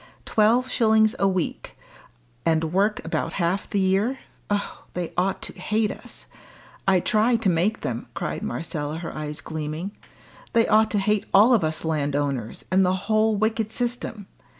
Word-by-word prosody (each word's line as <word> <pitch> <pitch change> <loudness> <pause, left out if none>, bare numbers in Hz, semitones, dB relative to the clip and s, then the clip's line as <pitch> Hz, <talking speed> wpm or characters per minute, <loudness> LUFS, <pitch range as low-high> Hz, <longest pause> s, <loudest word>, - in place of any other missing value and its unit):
Twelve 230 +4 +3
shillings 220 -2 +3
a 195 - +3
week, 185 -3 -2 0.7
and 160 0 +1
work 200 -1 +1
about 165 - -2
half 180 +2 -1
the 205 - 0
year! 195 +7 +2 0.3
Oh! 205 0 -2
they 175 -2 -3
ought 185 +2 0
to - - -5
hate 215 0 0
us! - - -10 0.6
I 190 -1 +5
try 220 +5 +2
to 225 -4 +1
make 180 +7 +1
them," 120 -1 -4
cried - - -3
Marcella, 150 +3 -4
her 165 0 -6
eyes 150 0 -5
gleaming. 155 +4 -4 0.6
"They 230 -1 +4
ought 220 0 +4
to 210 - 0
hate 210 +1 +1
all 215 +6 +7
of 225 - +3
us 155 +1 -2
landowners, 145 -6 -1
and 190 +1 +4
the 185 0 +2
whole 215 0 +3
wicked 220 +1 0
system. 240 -3 -3
195 Hz, 160 wpm, -24 LUFS, 160-220 Hz, 0.7 s, all